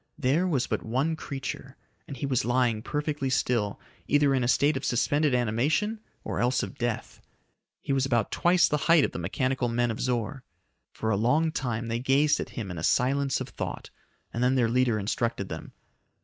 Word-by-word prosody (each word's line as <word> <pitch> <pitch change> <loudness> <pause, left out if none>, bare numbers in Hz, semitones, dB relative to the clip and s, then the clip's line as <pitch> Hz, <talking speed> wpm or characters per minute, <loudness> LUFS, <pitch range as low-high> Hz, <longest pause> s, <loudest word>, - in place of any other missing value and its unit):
There 155 +6 +2
was 140 -8 +1
but - - -2
one 135 +8 0
creature, 140 -3 -6 0.3
and 140 - -7
he 130 - -3
was 130 -3 +1
lying 120 -2 +1
perfectly 145 +1 -2
still, 115 -5 0 0.3
either 145 -1 +3
in 130 -2 +1
a - - +1
state 145 +4 +3
of 130 - -3
suspended 145 +3 +2
animation 135 - 0 0.2
or - - -3
else 125 +1 +1
of 140 - -7
death. 120 -2 -3 0.6
He 140 - -2
was 135 -1 +2
about 120 -5 +1
twice 175 +1 +4
the 150 - +1
height 165 -4 +6
of - - -4
the - - -5
mechanical 130 +8 -1
men 120 0 +1
of 110 - -6
Zor. 125 +1 -2 0.5
For 110 - -2
a - - +2
long 150 +9 +2
time 120 -5 -3
they 115 +1 -1
gazed 135 +4 +3
at - - -4
him 105 -6 -4
in 85 - -5
a - - -6
silence 135 +4 +2
of - - -5
thought, - - -6 0.4
and 120 - -1
then 130 +1 +3
their 120 -3 +2
leader 125 -2 +2
instructed 105 0 -2
them. 80 - -7
125 Hz, 195 wpm, -27 LUFS, 115-140 Hz, 0.6 s, height